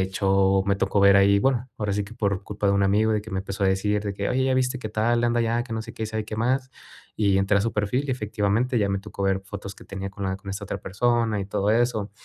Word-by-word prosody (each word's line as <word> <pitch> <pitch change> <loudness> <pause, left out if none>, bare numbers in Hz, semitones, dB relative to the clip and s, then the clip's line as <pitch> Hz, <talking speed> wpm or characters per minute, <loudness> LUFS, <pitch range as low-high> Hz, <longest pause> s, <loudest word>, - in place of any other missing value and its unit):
hecho, 95 0 +2
me 100 0 +1
tocó 100 - 0
ver 100 0 +7
ahí, 100 +1 +5
bueno, 130 +2 +1
ahora 105 -2 -2
sí 105 +1 0
que 100 +3 -10
por 100 -3 -1
culpa 105 0 -3
de - - +3
un 100 0 +2
amigo, 105 +3 +3
de 105 - +1
que 110 +2 -11
me 95 - -2
empezó 95 0 -3
a - - +4
decir, 105 +2 +1
de 100 -1 -3
que: 100 +1 -2
"Oye, 130 +1 +1
ya 130 0 +2
viste 130 0 0
qué 110 - -5
tal, 115 +3 +1
anda 120 0 +2
allá, 115 +1 +1
que 115 - -6
no 110 - -3
sé - - -10
qué, 110 - -4
y - - -2
sabe 110 0 -3
qué 110 0 -6
más". 130 +4 0 0.5
Y 100 -3 +3
entré 95 +1 +2
a - - +1
su 115 +3 -1
perfil, 105 +6 0
y - - -2
efectivamente, 110 +1 0
ya 100 - +1
me 100 0 0
tocó 100 0 -7
ver 95 0 +1
fotos 100 0 -7
que - - -15
tenía 95 0 -6
con 100 +1 -6
la 95 0 -1
con 100 0 -9
esta 100 +1 -5
otra 100 0 -4
persona 115 +2 0
y - - -3
todo 100 +1 0
eso. 110 -2 +1
105 Hz, 295 wpm, -24 LUFS, 100-115 Hz, 0.5 s, ver